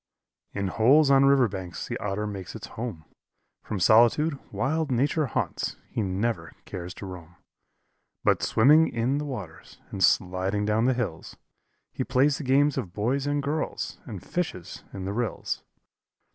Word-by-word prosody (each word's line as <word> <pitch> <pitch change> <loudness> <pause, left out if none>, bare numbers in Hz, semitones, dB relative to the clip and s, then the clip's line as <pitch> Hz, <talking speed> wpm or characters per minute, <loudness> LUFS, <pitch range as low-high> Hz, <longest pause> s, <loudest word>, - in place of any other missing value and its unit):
In 100 -1 -2
holes 140 +8 +5
on 135 0 +6
river 135 -3 +5
banks 90 -6 -6
the - - -3
Otter 105 +1 -2
makes 100 -3 -6
his - - -7
home; 110 -9 -5 0.6
From 105 - -4
solitude 120 - +4
wild 155 +4 -1
nature 140 +4 +1
haunts - - -2 0.2
he - - -1
never 95 -3 -2
cares 90 0 -7
to - - -8
roam; 85 -3 -10 0.9
But - - +3
swimming 150 +8 +5
in 120 +5 0
the 150 - -3
waters 105 - -8
and 95 - -1
sliding 95 +3 +2
down 110 +2 +2
the 130 0 +3
hills, 105 -10 -4 0.6
He - - -2
plays 135 +4 +2
the - - -5
games 140 +2 +3
of 95 -9 -6
boys 130 +7 -1
and 145 0 0
girls, 150 +2 -3
and 105 -9 -8
fishes 95 - -4
in 95 -2 -6
the 100 - -3
rills. 120 -1 -2
115 Hz, 160 wpm, -26 LUFS, 95-140 Hz, 0.9 s, on